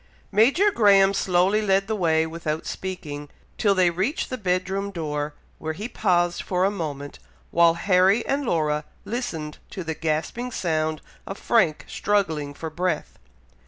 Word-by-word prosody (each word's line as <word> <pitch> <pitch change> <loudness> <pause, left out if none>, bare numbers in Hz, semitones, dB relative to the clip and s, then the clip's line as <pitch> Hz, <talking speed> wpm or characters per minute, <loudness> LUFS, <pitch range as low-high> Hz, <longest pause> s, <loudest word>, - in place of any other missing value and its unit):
Major 280 - +4
Graham 200 - +5
slowly 190 +2 +2
led 195 -1 +2
the 220 +2 -2
way 160 -4 +2
without 160 -1 -4
speaking, 150 -6 -6 0.3
till 200 -2 +3
they 180 -2 +4
reach 195 - -1
the 255 - -3
bed 185 -2 0
room 195 +1 -2
door, 150 -5 -3 0.2
where 160 0 -3
he 205 +7 -5
paused 175 -6 +1
for 185 0 0
a 195 - +2
moment, 145 -7 -5 0.3
while 170 -1 +5
Harry 190 +4 +3
and 280 +1 0
Laura 155 - 0 0.2
listened 165 -10 -4
to 185 - -6
the 160 -1 -3
gasping 165 +11 -2
sound 155 -5 -1 0.2
of 195 - -5
Frank 220 -10 +2
struggling 160 -8 -1
for 160 +1 -6
breath. 170 -1 -2
180 Hz, 155 wpm, -24 LUFS, 160-200 Hz, 0.3 s, Graham